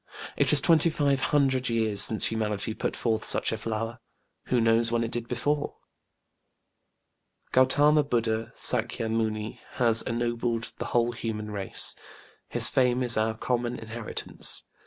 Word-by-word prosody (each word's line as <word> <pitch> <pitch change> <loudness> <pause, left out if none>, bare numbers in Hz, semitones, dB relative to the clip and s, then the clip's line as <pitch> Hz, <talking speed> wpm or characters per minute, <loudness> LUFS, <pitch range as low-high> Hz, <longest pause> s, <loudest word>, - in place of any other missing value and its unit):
It - - +2
is - - +7
twenty 165 -1 +4
five 145 -3 0
hundred 135 -3 +1
years 110 -3 0
since 110 0 +5
humanity 110 -1 -2
put - - -3
forth 110 -2 -1
such - - +2
a 110 - -3
flower: 115 +2 -4 0.5
who 125 - +1
knows 115 0 +2
when 115 0 0
it 115 - -4
did 120 0 -4
before? 145 +5 -2 1.8
GautĖĢama 145 +4 +4
BudĖĢdĖĢha, 115 -1 -1
SÄkya 115 -1 -1
Muni, 110 -1 -3
has 115 -3 +4
ennobled 120 -1 -2
the - - -3
whole 120 0 +1
human 110 -2 -5
race. 100 -2 -1 0.5
His - - +5
fame 125 -1 +1
is 120 -2 +4
our 110 0 -1
common 120 0 -2
inheritance. 115 0 -3
115 Hz, 140 wpm, -26 LUFS, 110-125 Hz, 1.8 s, is